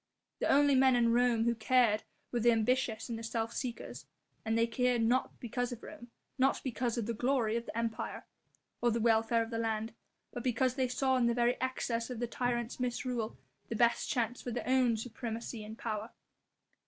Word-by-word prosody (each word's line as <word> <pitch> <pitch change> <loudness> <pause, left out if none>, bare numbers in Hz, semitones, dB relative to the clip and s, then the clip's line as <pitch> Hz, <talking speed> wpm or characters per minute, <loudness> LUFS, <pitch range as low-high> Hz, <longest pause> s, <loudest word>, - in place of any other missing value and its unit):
The - - 0
only 285 0 +5
men 260 -1 +5
in 235 -1 +3
Rome 240 -2 +3
who 235 0 +2
cared 230 -1 +3 0.3
were 240 - 0
the 240 +1 +5
ambitious 230 0 +1
and 230 -2 -4
the - - -8
self 225 0 -2
seekers, 245 -3 -5 0.4
and 225 0 0
they 230 - +4
cared 240 0 +1
not 250 +4 +1
because 245 0 -2
of 240 - -7
Rome, 275 -6 -10 0.3
not 270 +1 +3
because 240 -2 -1
of 230 - -1
the 235 - -2
glory 240 -1 +1
of 235 0 -3
the - - -6
Empire, 230 -1 -3 0.6
or 240 - +3
the 235 0 0
welfare 225 0 +3
of 225 - -8
the 230 - -2
land, 225 0 -2 0.4
but 240 - -5
because 255 0 +1
they 260 -1 0
saw 260 +1 +1
in 240 -2 +3
the 235 - +1
very 240 0 +3
excess 245 -2 -1
of 250 - -5
the 240 - 0
tyrant's 240 0 -2
misrule 245 -2 -2 0.3
the 230 - -2
best 235 +1 +2
chance 245 -2 -1
for - - -5
their 240 0 -4
own 255 -3 +3
supremacy 225 0 -5
and 215 +1 -9
power. 220 -1 -4
235 Hz, 200 wpm, -32 LUFS, 225-250 Hz, 0.6 s, only